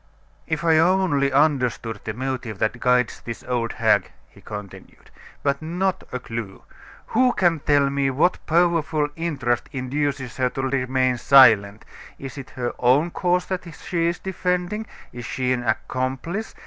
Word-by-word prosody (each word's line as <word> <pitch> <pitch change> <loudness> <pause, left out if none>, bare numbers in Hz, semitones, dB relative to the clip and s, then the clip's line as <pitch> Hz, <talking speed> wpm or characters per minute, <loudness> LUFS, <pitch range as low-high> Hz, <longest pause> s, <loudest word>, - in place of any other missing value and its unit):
"If 155 +1 -2
I 160 -2 +4
only 165 -6 +2
understood 130 -5 +1
the 110 - -4
motive 125 -4 -4
that 110 +4 -1
guides 125 -1 +1
this 115 -1 -7
old 120 -2 -2
hag!" - - +2 0.2
he - - -19
continued. 105 -3 -10 0.3
"But 140 0 0
not 180 +4 -1
a 125 - -2
clue! 115 -5 -7 0.5
Who 250 +2 +4
can 175 -4 +2
tell 145 -1 +3
me 140 -1 +1
what 150 +7 +1
powerful 160 -3 +2
interest 140 -8 -1
induces 135 -1 -3
her 130 -1 +1
to 135 - -4
remain 130 -1 +1
silent? 110 -7 +5 0.3
Is 135 +1 -8
it 135 - -9
her 125 -3 -4
own 135 +8 +3
cause 180 0 0
that 180 -2 -5
she 170 -2 -1
is 170 +1 -1
defending? 185 +3 -2 0.3
Is 120 - -7
she 130 +1 -1
an 125 - -2
accomplice? 130 - -3
140 Hz, 150 wpm, -23 LUFS, 125-170 Hz, 0.5 s, silent